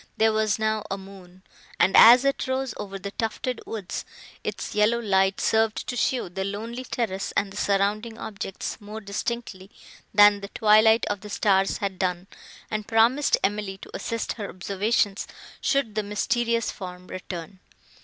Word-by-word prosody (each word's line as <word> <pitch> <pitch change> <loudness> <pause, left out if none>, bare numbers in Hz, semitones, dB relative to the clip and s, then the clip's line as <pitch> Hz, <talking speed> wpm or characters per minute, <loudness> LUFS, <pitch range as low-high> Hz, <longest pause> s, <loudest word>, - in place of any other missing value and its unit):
There 220 0 +3
was 215 -1 +1
now 215 -1 0
a 195 - -2
moon; 190 -1 -14 0.4
and, 190 - +4
as 245 +4 +9
it 275 -1 0
rose 260 -2 -1
over 195 -1 -6
the 200 +1 -6
tufted 230 +3 -3
woods, 205 -5 -5 0.4
its - - -4
yellow 210 +3 +3
light 195 -3 +2
served 220 0 +1
to 250 - -4
show 245 -1 0
the 190 +2 -4
lonely 225 +6 -5
terrace 195 -7 -2
and 200 -1 0
the - - -9
surrounding 205 +3 0
objects, 200 -3 -6
more 210 +2 -7
distinctly, 200 -1 -5 0.4
than 205 0 +6
the 200 - -6
twilight 220 +1 +4
of 205 -1 -3
the 210 - -9
stars 195 -2 +2
had 195 -2 -4
done, 180 -1 -1 0.5
and 215 -1 -3
promised 235 +6 +3
Emily 200 -1 -1
to - - -12
assist 230 0 -3
her 205 -3 -6
observations, 200 +2 -1 0.3
should 275 -6 +1
the 215 - 0
mysterious 230 +3 0
form 180 -1 -9
return. 185 0 -7
210 Hz, 160 wpm, -25 LUFS, 195-225 Hz, 0.5 s, as